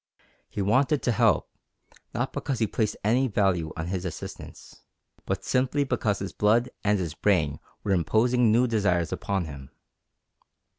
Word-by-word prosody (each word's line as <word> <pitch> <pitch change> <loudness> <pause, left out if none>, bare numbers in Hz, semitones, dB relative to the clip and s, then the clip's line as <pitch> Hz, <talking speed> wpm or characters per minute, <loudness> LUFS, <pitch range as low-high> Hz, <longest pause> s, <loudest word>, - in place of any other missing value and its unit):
He 100 - -3
wanted 135 +8 +2
to 120 - +2
help, 110 - +3 0.6
not - - -2
because 135 - -2
he 110 - +2
placed 105 0 -1
any 125 +6 +3
value 95 -7 +1
on 80 - -3
his 90 +1 -3
assistance, 90 -4 -8 0.5
but - - -2
simply 130 +3 +1
because 115 -6 0
his 95 - -5
blood 115 +4 +2
and 105 0 +3
his 85 -5 -3
brain 80 -5 +1 0.2
were 100 - -1
imposing 110 +6 +3
new 120 +3 +4
desires 100 -8 +1
upon 95 -3 -2
him. 70 -3 -9
105 Hz, 150 wpm, -26 LUFS, 90-120 Hz, 0.6 s, new